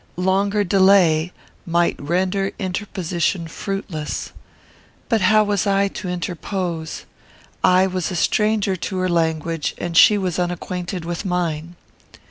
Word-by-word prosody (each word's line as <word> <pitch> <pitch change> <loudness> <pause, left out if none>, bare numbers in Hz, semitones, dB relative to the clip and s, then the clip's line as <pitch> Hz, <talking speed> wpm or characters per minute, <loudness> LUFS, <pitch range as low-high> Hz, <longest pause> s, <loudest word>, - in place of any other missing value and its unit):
Longer 200 +3 +1
delay 180 -4 +4 0.3
might 170 0 +1
render 185 +5 0
interposition 180 -3 -2
fruitless. 170 -3 -5 0.8
But 225 -4 +2
how 215 +3 +5
was 205 0 0
I 200 0 +2
to 190 - -7
interpose? 175 -1 -4 0.6
I 185 0 +5
was 185 -2 -2
a 185 - -4
stranger 210 +2 +1
to 185 +2 -4
her 185 0 0
language, 165 -1 -1
and 175 -1 -4
she 210 +5 +7
was 185 -3 -2
unacquainted 180 0 -3
with 170 +1 -4
mine. 175 -3 -2
180 Hz, 120 wpm, -21 LUFS, 170-195 Hz, 0.8 s, she